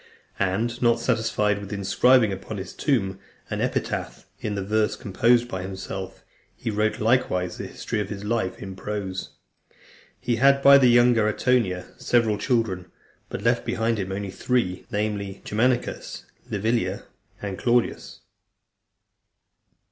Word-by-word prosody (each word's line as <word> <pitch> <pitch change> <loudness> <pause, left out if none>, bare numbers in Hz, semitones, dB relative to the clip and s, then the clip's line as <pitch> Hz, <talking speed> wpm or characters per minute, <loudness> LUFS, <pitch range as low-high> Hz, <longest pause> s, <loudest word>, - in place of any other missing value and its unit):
And 110 +6 0
not 120 -1 +3
satisfied 110 -3 +1
with 100 -1 -8
inscribing 105 +3 +3
upon 100 +3 -6
his 95 - -6
tomb 95 -10 0 0.3
an - - -2
epitaph - - -2
in 105 - -3
verse 110 +1 +1
composed 115 +5 +2
by 95 -6 -4
himself, 95 0 -6 0.3
he 115 - -4
wrote 110 +1 0
likewise 110 -6 +1
the - - -4
history - - -4
of 100 -2 -3
his 100 -1 -6
life 105 -3 -1
in 95 -1 -7
prose. 95 -2 -4 0.9
He 120 -1 -1
had 140 +2 +4
by 140 0 +9
the 130 - +5
younger 120 -2 +5
Antonia 110 -5 +1
several 110 -3 +2
children, 105 -7 0 0.4
but - - -5
left - - +2
behind 115 0 0
him 95 -1 -3
only 100 0 -4
three, 95 -4 -1
namely, 105 -2 -3
Germanicus, 120 +3 -1 0.2
Livilla, 110 +4 -1 0.4
and 100 -2 -5
Claudius. 120 -1 0
105 Hz, 135 wpm, -25 LUFS, 95-120 Hz, 0.9 s, by